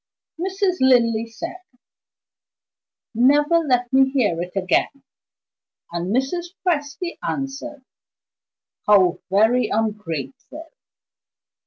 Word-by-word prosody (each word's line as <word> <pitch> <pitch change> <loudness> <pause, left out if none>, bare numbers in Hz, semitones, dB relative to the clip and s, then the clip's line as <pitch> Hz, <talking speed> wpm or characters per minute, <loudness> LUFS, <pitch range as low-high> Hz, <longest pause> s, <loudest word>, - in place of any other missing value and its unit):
Mrs. 380 0 -1
Linley 235 -3 +3
said: 330 +11 -7 1.6
"Never 290 +8 +4
let 250 -5 0
me 265 0 +5
hear 220 -11 0
it 180 +1 -6
again!" 195 +8 0 0.9
And 170 +1 -3
Mrs. 340 - -2
Presty 320 +1 -2
answered: 275 +1 -5 1.0
"How 190 -4 +4
very 220 +5 +3
ungrateful!" 215 - -4
260 Hz, 80 wpm, -21 LUFS, 215-300 Hz, 1.6 s, me